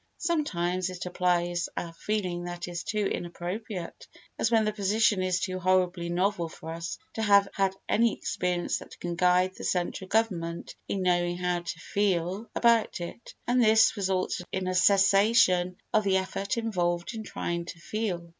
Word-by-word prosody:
Sometimes 185 Hz, -, -1 dB
it 185 Hz, -1 st, -6 dB
applies 175 Hz, -1 st, 0 dB
a 170 Hz, -1 st, -4 dB
feeling 180 Hz, -2 st, -2 dB
that 175 Hz, 0 st, -5 dB
is 175 Hz, -1 st, -5 dB
too 210 Hz, -1 st, -1 dB
inappropriate, 180 Hz, +2 st, -5 dB, 0.3 s
as -, -, +2 dB
when 225 Hz, -2 st, +3 dB
the 215 Hz, -, 0 dB
position 210 Hz, 0 st, +2 dB
is 185 Hz, -1 st, +1 dB
too 185 Hz, -1 st, -3 dB
horribly 180 Hz, -1 st, +1 dB
novel 175 Hz, -1 st, 0 dB
for 160 Hz, 0 st, -9 dB
us 165 Hz, 0 st, -5 dB, 0.2 s
to 225 Hz, -, -3 dB
have 200 Hz, -2 st, +5 dB
had 195 Hz, -1 st, +1 dB
any 230 Hz, +1 st, +3 dB
experience 180 Hz, -1 st, -1 dB
that -, -, -13 dB
can 175 Hz, -1 st, -3 dB
guide 180 Hz, +1 st, +3 dB
the -, -, -10 dB
central 180 Hz, +1 st, -1 dB
government 185 Hz, -6 st, -1 dB
in 195 Hz, -2 st, -2 dB
knowing 175 Hz, -1 st, +1 dB
how 180 Hz, -1 st, 0 dB
to 170 Hz, -1 st, -6 dB
feel 190 Hz, +2 st, -1 dB
about 235 Hz, -4 st, +3 dB
it, 175 Hz, +7 st, -8 dB
and 245 Hz, 0 st, +3 dB
this 220 Hz, 0 st, +5 dB
results 190 Hz, -3 st, -1 dB
in 190 Hz, -1 st, -2 dB
a 185 Hz, -, 0 dB
cessation 195 Hz, -1 st, +4 dB, 0.2 s
of 215 Hz, -, +4 dB
the 195 Hz, -1 st, +3 dB
effort 195 Hz, +4 st, -2 dB
involved 175 Hz, -5 st, -1 dB
in 220 Hz, -, -5 dB
trying 170 Hz, -4 st, -3 dB
to 170 Hz, -, -8 dB
feel. 180 Hz, -2 st, -3 dB
185 Hz, 165 wpm, -28 LUFS, 175-210 Hz, 0.3 s, have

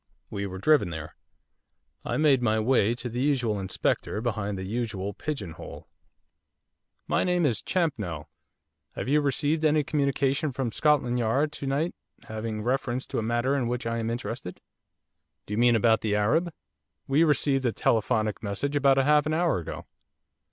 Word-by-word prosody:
We 100 Hz, 0 st, -3 dB
were 95 Hz, 0 st, -7 dB
driven 145 Hz, -, +3 dB
there. 80 Hz, -2 st, -7 dB, 0.9 s
I -, -, -2 dB
made 145 Hz, -4 st, +4 dB
my 110 Hz, -2 st, +2 dB
way 115 Hz, -1 st, +2 dB
to 125 Hz, -, -5 dB
the 120 Hz, +1 st, -4 dB
usual 125 Hz, -7 st, +1 dB
inspector 95 Hz, +2 st, -1 dB
behind 105 Hz, -4 st, -2 dB
the 95 Hz, -, -5 dB
usual 100 Hz, -1 st, -3 dB
pigeon 145 Hz, -, -4 dB
hole. -, -, -10 dB, 1.2 s
'My -, -, +2 dB
name 180 Hz, -2 st, +2 dB
is 120 Hz, -7 st, +1 dB
Champnell. 105 Hz, -, -2 dB, 0.7 s
Have -, -, -5 dB
you 150 Hz, +3 st, +3 dB
received 145 Hz, +3 st, 0 dB
any 155 Hz, -1 st, +3 dB
communication 140 Hz, 0 st, 0 dB
from 125 Hz, -2 st, -2 dB
Scotland 130 Hz, -3 st, +2 dB
Yard 135 Hz, +7 st, +1 dB
to 145 Hz, -2 st, -6 dB
night 145 Hz, +6 st, 0 dB, 0.3 s
having 110 Hz, -1 st, -5 dB
reference 130 Hz, +1 st, -1 dB
to -, -, -3 dB
a -, -, -1 dB
matter 120 Hz, +4 st, 0 dB
in 130 Hz, -4 st, 0 dB
which 120 Hz, 0 st, -3 dB
I 115 Hz, 0 st, -1 dB
am 115 Hz, 0 st, -2 dB
interested?' 115 Hz, -4 st, -5 dB, 0.9 s
'Do 105 Hz, -, -6 dB
you 105 Hz, -, 0 dB
mean 120 Hz, 0 st, +5 dB
about 110 Hz, 0 st, +3 dB
the 105 Hz, -2 st, 0 dB
Arab? 150 Hz, +12 st, +2 dB, 0.5 s
We 140 Hz, +4 st, +3 dB
received 140 Hz, -4 st, +2 dB
a -, -, +1 dB
telephonic 110 Hz, -1 st, 0 dB
message 110 Hz, +8 st, -2 dB
about 140 Hz, -1 st, +4 dB
half 150 Hz, +2 st, +4 dB
an 155 Hz, -, 0 dB
hour 170 Hz, -, +2 dB
ago. 80 Hz, -, -7 dB
125 Hz, 165 wpm, -27 LUFS, 110-145 Hz, 1.2 s, mean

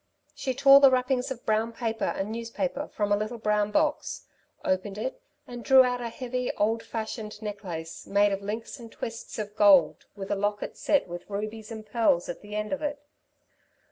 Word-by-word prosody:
She 260 Hz, -1 st, -3 dB
tore 275 Hz, +1 st, +8 dB
the 275 Hz, -1 st, +8 dB
wrappings 255 Hz, 0 st, +1 dB
of 255 Hz, -3 st, -7 dB
brown 220 Hz, +1 st, +1 dB
paper 225 Hz, -1 st, -2 dB
and 195 Hz, +3 st, -2 dB
newspaper 235 Hz, +6 st, -3 dB
from 205 Hz, -1 st, -2 dB
a -, -, +6 dB
little 215 Hz, +3 st, -3 dB
brown 210 Hz, -1 st, +1 dB
box, 300 Hz, +7 st, 0 dB, 0.4 s
opened 185 Hz, +2 st, -1 dB
it 260 Hz, -, -4 dB, 0.2 s
and 240 Hz, -1 st, -8 dB
drew 265 Hz, -1 st, +7 dB
out 245 Hz, -1 st, -1 dB
a 235 Hz, -, -3 dB
heavy, 250 Hz, +1 st, -3 dB
old 225 Hz, +2 st, +1 dB
fashioned 220 Hz, -2 st, -5 dB
necklace 190 Hz, -6 st, -6 dB
made 205 Hz, +1 st, +3 dB
of 195 Hz, 0 st, -2 dB
links 220 Hz, +6 st, -5 dB
and 230 Hz, -1 st, -11 dB
twists 230 Hz, 0 st, -7 dB
of 210 Hz, -1 st, -5 dB
gold, 195 Hz, -7 st, +5 dB
with 195 Hz, -1 st, -6 dB
a -, -, +2 dB
locket 205 Hz, +1 st, -2 dB
set 290 Hz, -, +1 dB
with 175 Hz, +2 st, -8 dB
rubies 215 Hz, +2 st, -5 dB
and 220 Hz, -1 st, -7 dB
pearls 215 Hz, -6 st, +2 dB
at 175 Hz, -, -5 dB
the 210 Hz, 0 st, -8 dB
end 210 Hz, +4 st, -2 dB
of 285 Hz, -, -3 dB
it. 295 Hz, -1 st, -2 dB
220 Hz, 190 wpm, -27 LUFS, 205-250 Hz, 0.4 s, tore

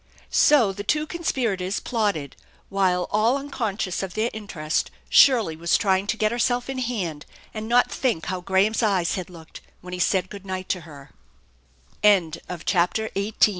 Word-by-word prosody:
So 245 Hz, -10 st, +4 dB
the 205 Hz, +1 st, -6 dB
two 300 Hz, +8 st, +1 dB
conspirators 230 Hz, -, -2 dB
plotted, 205 Hz, -, -2 dB, 0.3 s
while 185 Hz, -2 st, +1 dB
all 225 Hz, +5 st, +3 dB
unconscious 225 Hz, -9 st, -3 dB
of 190 Hz, -2 st, -6 dB
their 220 Hz, +2 st, 0 dB
interest 175 Hz, -8 st, -2 dB, 0.2 s
Shirley 235 Hz, -, +5 dB
was 170 Hz, +2 st, +2 dB
trying 195 Hz, -1 st, +1 dB
to 220 Hz, -, -1 dB
get 215 Hz, 0 st, +1 dB
herself 245 Hz, +2 st, 0 dB
in 265 Hz, -, -4 dB
hand 190 Hz, -12 st, -3 dB, 0.3 s
and 215 Hz, 0 st, -5 dB
not 245 Hz, +1 st, +4 dB
thick 230 Hz, -11 st, -1 dB
how 185 Hz, -1 st, -3 dB
Graham's 195 Hz, +5 st, +2 dB
eyes 190 Hz, -6 st, +1 dB
had 185 Hz, -2 st, -4 dB
looked 165 Hz, -3 st, -12 dB, 0.2 s
when 180 Hz, 0 st, -9 dB
he 180 Hz, -, -4 dB
said 185 Hz, +1 st, +1 dB
good 200 Hz, -2 st, -9 dB
night 185 Hz, -1 st, -5 dB
to 185 Hz, -, 0 dB
CHAPTEK 145 Hz, -4 st, -13 dB
XIX -, -, -35 dB
SINCE 180 Hz, -6 st, +4 dB
the 175 Hz, -2 st, -7 dB
pastor 195 Hz, +4 st, +1 dB
195 Hz, 170 wpm, -24 LUFS, 175-225 Hz, 0.3 s, Shirley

